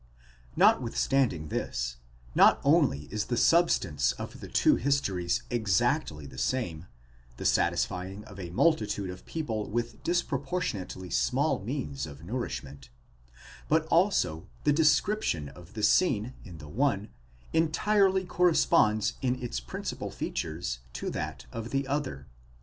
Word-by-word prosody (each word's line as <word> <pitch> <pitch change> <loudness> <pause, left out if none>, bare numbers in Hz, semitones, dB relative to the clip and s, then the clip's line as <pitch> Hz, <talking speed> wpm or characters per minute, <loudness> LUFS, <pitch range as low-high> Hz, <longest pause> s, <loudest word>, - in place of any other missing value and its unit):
Notwithstanding 115 - +2
this, - - -3 0.4
not - - +6
only 70 - +3
is 105 -1 -1
the 120 - -2
sub 170 +6 +5
stance 75 -7 +1
of - - -8
the - - -8
two - - +4
histories 100 -11 0
exactly 95 -9 +1
the 65 -2 -9
same—the 60 - -5
satisfying 95 +3 0
of 100 -2 -11
a 90 -2 -5
multitude 105 - +1
of 90 - -12
people 115 -10 -3
with 120 +2 -3
disproportionately 135 - -2
small - - +1
means 70 +1 -4
of 70 +1 -11
nourishment; 85 - -5 0.8
but 160 +1 +3
also 165 - +2 0.2
the 145 - +4
de 160 +2 +3
scription 150 - +2
of 90 +8 -15
the 105 - -4
scene 110 - +3
in 90 -7 -10
the 75 -1 -10
one, 105 - 0 0.4
entirely 190 +4 +3
corresponds 150 - +3
in 130 -1 0
its 120 - -3
principal - - -5
features 75 -7 -4
to - - -4
that - - -5
in 115 - -4
the 135 +3 -2
other. 135 - -3
105 Hz, 130 wpm, -29 LUFS, -, 0.8 s, not